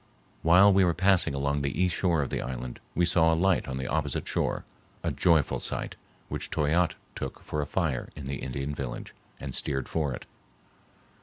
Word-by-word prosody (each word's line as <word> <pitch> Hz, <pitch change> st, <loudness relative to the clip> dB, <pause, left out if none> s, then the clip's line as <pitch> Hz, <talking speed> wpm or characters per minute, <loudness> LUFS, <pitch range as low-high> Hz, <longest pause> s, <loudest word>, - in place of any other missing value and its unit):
While 90 Hz, +5 st, +7 dB
we 95 Hz, 0 st, +5 dB
were 85 Hz, -2 st, +2 dB
passing 95 Hz, -5 st, +3 dB
along 70 Hz, +1 st, 0 dB
the 70 Hz, +3 st, -2 dB
east 90 Hz, -2 st, +2 dB
shore 85 Hz, -5 st, +2 dB
of 70 Hz, -, -5 dB
the -, -, -1 dB
island 65 Hz, -1 st, -5 dB, 0.2 s
we 85 Hz, -, +3 dB
saw 80 Hz, -1 st, +4 dB
a -, -, +3 dB
light 90 Hz, -2 st, +2 dB
on 65 Hz, 0 st, -3 dB
the 65 Hz, -, -3 dB
opposite -, -, -1 dB
shore, -, -, -1 dB, 0.4 s
a -, -, 0 dB
joyful 80 Hz, -5 st, +3 dB
sight, -, -, -3 dB, 0.3 s
which -, -, -5 dB
Toyatte 80 Hz, +3 st, +2 dB, 0.2 s
took 65 Hz, -, -5 dB
for 75 Hz, -, -2 dB
a 75 Hz, -, -3 dB
fire 80 Hz, -9 st, -1 dB
in 70 Hz, -, -7 dB
the 70 Hz, +1 st, -3 dB
Indian 70 Hz, +2 st, -3 dB
village, 65 Hz, -4 st, -5 dB, 0.3 s
and 70 Hz, -2 st, -6 dB
steered 70 Hz, -1 st, -1 dB
for 75 Hz, -4 st, -1 dB
it. -, -, -6 dB
75 Hz, 190 wpm, -28 LUFS, 70-85 Hz, 0.4 s, While